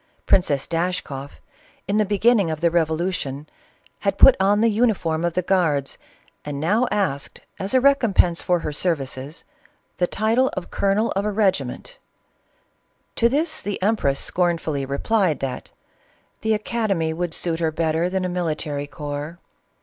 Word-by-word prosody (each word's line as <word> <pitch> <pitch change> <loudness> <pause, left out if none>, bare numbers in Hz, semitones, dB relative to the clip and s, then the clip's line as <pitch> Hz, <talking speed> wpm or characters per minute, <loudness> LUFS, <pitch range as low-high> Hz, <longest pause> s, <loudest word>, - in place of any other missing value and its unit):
Princess 145 -7 +2
Dashkoff, 165 -5 -3 0.5
in 200 +2 +1
the 215 - +3
beginning 205 -1 +3
of 155 -1 -3
the 170 +1 +2
revolution, 160 -3 -1 0.5
had 200 -1 -1
put 270 - +8
on 200 +2 +3
the 230 0 +4
uniform 200 -8 +1
of 170 -1 -1
the 185 - +1
guards, 160 -7 0 0.4
and 145 -1 -5
now 210 - +2
asked, 140 -9 -2 0.2
as 195 +6 -2
a - - +6
recompense 235 -10 +3
fur 180 - +2
her 165 - -4
• - - -6
services, 145 -3 -3 0.5
the 180 - +1
title 225 +7 +1
of 180 - -5
colonel 200 +3 +1
of 195 - -1
a 210 - -1
regiment; 200 - -1 1.2
to 235 - +3
this 310 +5 0
the 205 -1 -4
empress 195 -10 +1
scornfully 165 -6 -1
replied 175 +4 +1
that 135 -2 -5 0.4
" - - -38
the 220 0 +2
academy 210 -7 -1
would 170 0 -3
suit 165 -2 -2
her 160 -2 0
better 160 +2 0
than 185 0 -1
a - - 0
military 155 -5 -2
corps." 145 +2 -6
175 Hz, 155 wpm, -22 LUFS, 155-205 Hz, 1.2 s, put